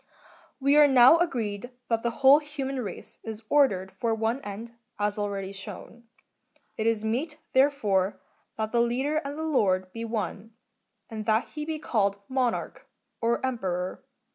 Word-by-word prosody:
3.'We 280 +2 +4
are 300 -1 +8
now 260 +3 +7
agreed 240 - -2 0.2
that 230 -1 +1
the 235 - 0 0.2
whole 280 +3 +9
human 275 -3 -4
race 200 -6 -8
is 220 0 -7
ordered 195 -11 +3
for 230 -1 +1
one 225 +4 -1
end, 220 +2 -7 0.2
as 205 0 0
already 200 -2 -3
shown. 200 +4 -9 0.7
It 220 - -1
is 220 -1 +1
meet, 285 +8 -2 0.2
therefore, 210 -9 +2 0.4
that 220 0 -2
the 235 - +3
leader 260 +6 0
and 285 -1 -3
lord 195 -13 +1
be 230 - -5
one, 225 -1 -4 0.5
and 215 -1 -6
that 220 +1 +2
he 300 -1 -5
be 315 0 -3
called 200 -9 0
Monarch, 260 -2 -2 0.3
or 235 +2 +1
Emperor. 185 -8 -3
230 Hz, 150 wpm, -27 LUFS, 205-270 Hz, 0.7 s, whole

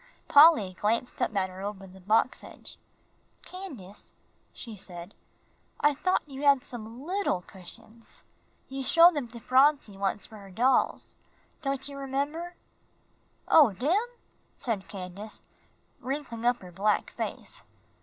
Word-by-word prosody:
Polly 285 - +7
glanced 230 +4 0
up 220 - 0
at 190 -1 0
her 185 +1 -9
over 200 -1 -5
the 190 0 -14
box 220 +6 +2
edge. - - -9 0.7
"Candace," 270 - -9 0.4
she 230 -3 -8
said, 180 -1 -8 0.7
"I 295 0 +4
thought 365 +4 0
you 275 -1 -8
had 280 -3 +5
some 235 +2 -7
little 370 - 0
cushions. 220 +5 -12 0.4
You 270 0 -5
showed 340 +5 +7
them 290 -5 -3
to 235 0 -10
Phronsie 260 -4 +3
once 195 +1 -1
for 220 - -12
her 200 -1 -12
dolls, 245 +8 +1 0.4
don't 275 -2 -2
you 280 -1 -7
remember?" 290 +6 -3 0.9
"Oh, 285 -10 +7
dem?" 280 - +1 0.6
said 215 -6 -3
Candace, 195 +2 -7 0.6
wrinkling 255 -4 -4
up 245 -3 +2
her 180 - -10
black 205 +4 +1
face. - - -5
235 Hz, 135 wpm, -28 LUFS, 200-280 Hz, 0.9 s, Polly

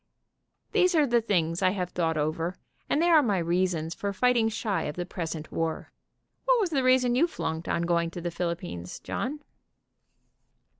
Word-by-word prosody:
These 365 -4 +3
are 305 -2 +5
the 240 -3 +2
things 170 -6 0
I 185 - +4
have 180 -1 -2
thought 165 -2 0
over, 160 +4 -1 0.3
and - - +2
they 340 +2 +3
are 320 -3 +7
my 210 -8 +1
reasons 170 -1 0
for 200 +2 -3
fight 250 +5 +2
ing 225 -2 +3
shy 215 -2 -2
of 150 - -4
the 175 - -3
present 165 -3 -5
war. 165 -1 -3 0.6
\Yhat - - +5
was 385 -6 0
the 275 -4 +2
reason 255 -1 +4
you 290 +8 +4
flunked 160 - -4
on 170 - 0
going 170 -1 +1
to 175 +1 -7
the 175 0 -3
Philippines, 170 - -4
John?" 290 +5 -4
180 Hz, 185 wpm, -27 LUFS, 165-250 Hz, 0.6 s, are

